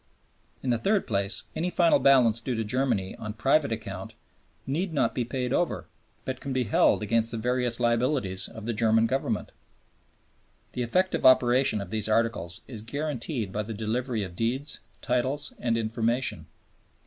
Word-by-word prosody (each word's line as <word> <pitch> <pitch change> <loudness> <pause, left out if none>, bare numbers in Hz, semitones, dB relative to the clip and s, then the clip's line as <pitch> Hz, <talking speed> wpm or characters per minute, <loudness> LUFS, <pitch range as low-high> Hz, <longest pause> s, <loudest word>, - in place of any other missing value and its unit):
In 130 - 0
the 120 - +1
third 200 - +1
place, 100 -1 0
any 175 +3 -1
final 170 -4 +4
balance 125 -4 +5
due 125 +1 -2
to 115 - -1
Germany 110 -4 -1
on 110 -1 -6
private 135 +5 +2
account 100 -4 -6 0.5
need 165 +6 -2
not 140 - +2
be 125 - -1
paid 125 +1 -2
over, 175 - 0 0.4
but 130 -1 -3
can 140 - -4
be 130 -1 +1
held 105 0 +3
against 115 +2 +1
the 115 - -3
various 125 +1 0
liabilities 120 -4 +1
of 110 -1 -10
the 120 - -1
German 110 0 +3
Government. 135 +4 -1 1.2
The 125 - -4
effective 185 +11 +1
operation 125 -3 +5
of 100 -2 -8
these 110 -1 +1
Articles 110 -7 0
is 115 -5 -6
guaranteed 130 - -3
by 105 - -1
the 110 +1 -6
delivery 115 +1 -2
of 90 -2 -7
deeds, 130 +8 -1 0.2
titles, 130 +4 0
and 115 -2 0
information. 115 +3 -1
120 Hz, 160 wpm, -27 LUFS, 110-130 Hz, 1.2 s, balance